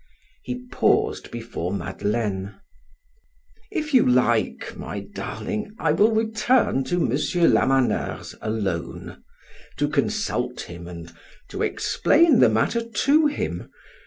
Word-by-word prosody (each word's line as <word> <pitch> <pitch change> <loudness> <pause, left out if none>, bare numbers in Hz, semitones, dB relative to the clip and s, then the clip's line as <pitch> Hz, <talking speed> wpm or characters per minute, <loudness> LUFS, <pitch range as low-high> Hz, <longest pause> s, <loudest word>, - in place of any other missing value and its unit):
He 250 0 -6
paused 430 0 +1
before 115 -7 -5
Madeleine. 100 -1 -2 1.1
"If 310 -6 -3
you 255 - +7
like, 120 -2 +1
my - - -6
darling, 205 - -5
I 160 - +1
will 205 +8 +4
return 220 - +2
to 175 - -1
M. 175 - +1 0.4
Lamaneur's 135 -2 +1
alone, 100 -6 -4 0.5
to 145 - +1
consult 145 - -1
him 85 0 -9
and 85 -1 -9 0.4
to - - -5
explain 310 -5 +3
the - - +6
matter 235 - +1
to 275 +7 +2
him. 295 - -4
145 Hz, 110 wpm, -24 LUFS, -, 1.1 s, you